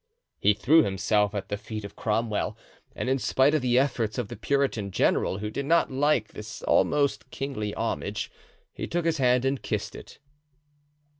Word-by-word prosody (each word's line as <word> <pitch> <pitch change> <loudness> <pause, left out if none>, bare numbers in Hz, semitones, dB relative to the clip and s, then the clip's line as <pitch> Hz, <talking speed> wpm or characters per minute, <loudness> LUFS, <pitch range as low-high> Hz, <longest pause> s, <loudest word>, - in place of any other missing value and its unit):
He 105 0 +4
threw 155 +9 +5
himself 105 -1 +1
at 100 -1 -4
the 105 - -2
feet 105 0 -6
of 100 - -10
Cromwell, 110 -1 -1 0.4
and - - -3
in 135 +1 +2
spite 135 +3 +3
of 155 - +2
the 125 -1 +2
efforts 125 -5 +1
of 120 -5 -2
the - - -6
Puritan 135 -8 0
general, 95 0 +1
who 105 +1 -4
did 140 +4 -4
not 170 -2 +3
like 135 -4 +2
this 105 0 -9
almost 145 -1 +2
kingly 130 -7 -4
homage, - - -3 0.4
he - - -5
took 170 0 -1
his 165 -2 +1
hand 125 0 +3
and 135 0 0
kissed - - -3
it. - - -11
125 Hz, 175 wpm, -27 LUFS, 105-140 Hz, 0.4 s, threw